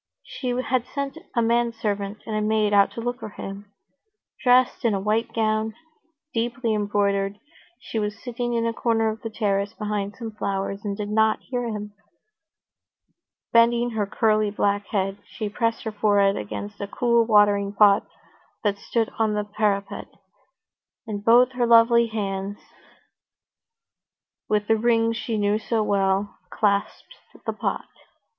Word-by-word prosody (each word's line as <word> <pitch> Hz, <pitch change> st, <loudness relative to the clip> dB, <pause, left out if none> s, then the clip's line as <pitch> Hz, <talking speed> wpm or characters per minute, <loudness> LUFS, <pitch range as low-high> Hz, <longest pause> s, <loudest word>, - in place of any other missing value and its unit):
She 255 Hz, -, -7 dB
had 250 Hz, 0 st, 0 dB
sent 280 Hz, +2 st, -4 dB, 0.2 s
a 235 Hz, -, +3 dB
manservant 225 Hz, -3 st, -1 dB
and 220 Hz, -, -4 dB
a 215 Hz, -, 0 dB
maid 215 Hz, -1 st, +1 dB
out 200 Hz, -1 st, +5 dB
to 230 Hz, -, -5 dB
look 245 Hz, +2 st, -3 dB
for -, -, -6 dB
him. 200 Hz, 0 st, -8 dB, 0.7 s
Dressed 250 Hz, 0 st, +4 dB
in 225 Hz, -4 st, +2 dB
a -, -, -1 dB
white 220 Hz, +3 st, 0 dB
gown, 220 Hz, -1 st, 0 dB, 0.6 s
deeply 235 Hz, 0 st, -1 dB
embroidered, 200 Hz, -1 st, 0 dB, 0.4 s
she 225 Hz, -, -4 dB
was 210 Hz, 0 st, -2 dB
sitting 240 Hz, 0 st, -3 dB
in 230 Hz, 0 st, +1 dB
a 230 Hz, -, 0 dB
corner 225 Hz, -1 st, +1 dB
of 220 Hz, +1 st, -5 dB
the 225 Hz, -, -4 dB
terrace 205 Hz, -1 st, -1 dB
behind 210 Hz, -1 st, -3 dB
some 230 Hz, -2 st, -6 dB
flowers, 195 Hz, -1 st, -3 dB
and 200 Hz, -2 st, -3 dB
did 210 Hz, -1 st, -4 dB
not 220 Hz, 0 st, +2 dB
hear 245 Hz, -2 st, -3 dB
him. 210 Hz, -2 st, -5 dB, 1.6 s
Bending 235 Hz, +1 st, +4 dB
her 215 Hz, -3 st, -1 dB
curly 215 Hz, 0 st, +2 dB
black 205 Hz, 0 st, 0 dB
head, 195 Hz, -1 st, -1 dB
she 215 Hz, -2 st, -5 dB
pressed 230 Hz, +2 st, -1 dB
her 220 Hz, -, -3 dB
forehead 205 Hz, -1 st, +3 dB
against 105 Hz, -, -6 dB
a 200 Hz, -, -3 dB
cool 235 Hz, +2 st, +2 dB
watering 205 Hz, -2 st, +4 dB
pot 200 Hz, -1 st, +5 dB, 0.6 s
that 200 Hz, -2 st, 0 dB
stood 225 Hz, +2 st, -1 dB
on 215 Hz, -1 st, +2 dB
the 210 Hz, -, 0 dB
parapet, 205 Hz, -1 st, -1 dB, 1.0 s
and 205 Hz, -3 st, -5 dB
both 240 Hz, +3 st, +6 dB
her 245 Hz, -2 st, 0 dB
lovely 235 Hz, 0 st, +6 dB
hands, 200 Hz, -2 st, -3 dB, 1.9 s
with 210 Hz, -1 st, +1 dB
the 225 Hz, -, +3 dB
rings 230 Hz, 0 st, +1 dB
he 225 Hz, -2 st, 0 dB
knew 205 Hz, +1 st, +1 dB
so 225 Hz, 0 st, 0 dB
well, 195 Hz, 0 st, 0 dB
clasped 205 Hz, -, -1 dB, 0.3 s
the -, -, -1 dB
pot. -, -, -3 dB
215 Hz, 150 wpm, -24 LUFS, 205-230 Hz, 1.9 s, both